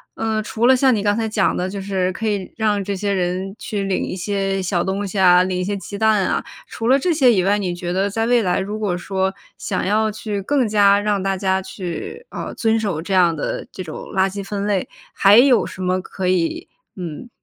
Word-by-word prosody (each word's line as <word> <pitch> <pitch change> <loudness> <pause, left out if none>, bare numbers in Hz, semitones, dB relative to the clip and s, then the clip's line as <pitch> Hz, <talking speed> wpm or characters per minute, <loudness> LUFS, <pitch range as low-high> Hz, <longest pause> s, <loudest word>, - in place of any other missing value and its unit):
呃， 220 -1 -1
除 225 +2 -1
了 260 - +7
像 260 0 +4
你 215 - 0
刚 205 0 +1
才 225 0 -1
讲 215 - +1
的， 180 +1 -2
就 200 +1 -5
是 190 -1 -1
可 220 +4 -4
以 200 -3 -2
让 210 -3 +1
这 200 - -3
些 200 +1 -1
人 185 +1 -2
去 210 -4 -4
领 195 -1 -1
一 - - -4
些 195 0 -1
小 175 -1 0
东 195 +1 -2
西 195 - -6
啊、 180 -1 +6
领 185 0 -2
一 180 - -1
些 200 +2 -2
鸡 200 +2 -7
蛋 215 -2 +3
啊。 - - -1 0.2
除 225 +1 -3
了 270 +2 +5
这 350 +5 +1
些 270 -6 +5
以 190 -5 +2
外， 200 +2 +2
你 185 -4 -2
觉 175 0 -4
得 195 +2 +1
在 225 +3 -1
未 240 -1 +3
来， 180 -2 +1
如 205 +2 -3
果 200 -5 -1
说 190 +1 -1 0.2
想 185 - -2
要 215 +2 +1
去 210 -1 -4
更 260 +4 +1
加 205 -1 +4
让 205 -1 0
大 195 0 0
家 190 0 0
去， 190 - -7
呃， - - -6
遵 225 -1 +1
守 200 -8 -2
这 190 +4 -4
样 180 -3 +4
的 155 - -4
这 - - -7
种 155 - -7 0.2
垃 190 0 +2
圾 200 +1 -6
分 200 0 -4
类， 200 -3 0 0.2
还 200 +2 +6
有 250 -1 +5
什 185 - -8
么 185 0 0
可 185 0 -5
以， 185 - 0 0.3
嗯， 175 +6 -7
200 Hz, 255 characters per minute, -20 LUFS, 185-215 Hz, 0.3 s, 了